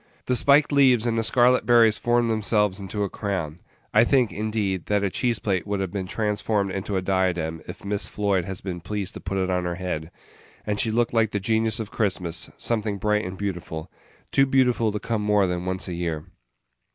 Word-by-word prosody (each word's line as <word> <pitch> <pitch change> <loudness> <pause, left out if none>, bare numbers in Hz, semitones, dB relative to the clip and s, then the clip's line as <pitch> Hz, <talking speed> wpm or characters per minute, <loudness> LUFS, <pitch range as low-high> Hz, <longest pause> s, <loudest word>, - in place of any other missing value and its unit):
The 125 - +1
spiked 145 +4 +4
leaves 130 -5 +4
and 115 -1 +1
the 115 - +1
scarlet 125 +2 +3
berries 115 -3 +5
formed 120 -1 +2
themselves 105 -2 +1
into 100 +1 -3
a - - 0
crown 95 -6 -4 0.3
I 110 - +6
think, 125 -2 +2
indeed, 105 -4 -2
that 105 -1 +1
a 100 - 0
cheese 120 +1 0
plate 100 -3 -2
would 100 -1 -1
have 95 -2 -2
been 95 -2 -4
transformed 105 -1 -1
into 95 +1 -3
a 95 - -2
diadem 90 -4 0
if - - -9
Miss 100 0 0
Floyd 100 -3 0
has 95 -1 -6
been 90 -3 -5
pleased 100 +1 -4
to - - -7
put 95 +1 -4
it 95 -1 0
on 90 -1 0
her 85 0 -2
head 85 -3 -4 0.6
and 105 -1 -2
she 115 - +2
looked 120 +2 +1
like 115 -2 +3
the 105 - 0
genius 110 +2 +1
of 110 -2 -5
Christmas: 90 -5 -1
something 110 -3 -1
bright 105 +2 +1
and 90 +1 -6
beautiful 90 -5 -5 0.4
too 135 0 +4
beautiful 125 -4 +2
to 105 - -3
come 110 -1 -2
more 105 -1 +3
than 90 -1 -2
once 95 -2 -2
a 90 - -4
year. 85 -3 -3
105 Hz, 210 wpm, -24 LUFS, 95-115 Hz, 0.6 s, I